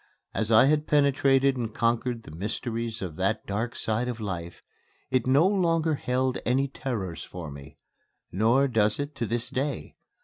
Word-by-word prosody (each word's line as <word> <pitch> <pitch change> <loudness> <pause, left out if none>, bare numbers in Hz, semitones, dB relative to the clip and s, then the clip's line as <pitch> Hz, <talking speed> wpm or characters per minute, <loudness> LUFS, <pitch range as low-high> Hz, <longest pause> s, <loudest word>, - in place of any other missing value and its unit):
As 110 0 -1
I 110 +3 +7
had 150 +2 +2
penetrated 140 -2 +3
and 115 -2 -3
conquered 115 0 0
the - - -11
mysteries 115 +3 -3
of 85 -5 -6
that 95 +4 0
dark 115 +4 -3
side 110 +3 -1
of 120 -2 -4
life, 85 -5 -5 0.5
it 130 -2 +1
no 140 +6 +5
longer 165 -5 +2
held 130 -2 0
any 135 +3 +1
terrors 115 - -4
for 85 -4 -8
me. 70 +2 -11 0.5
Nor 115 +8 +3
does 110 -4 +2
it 145 +1 -3
to 115 - -1
this 120 +3 -1
day. 135 0 -3
120 Hz, 165 wpm, -27 LUFS, 105-135 Hz, 0.5 s, I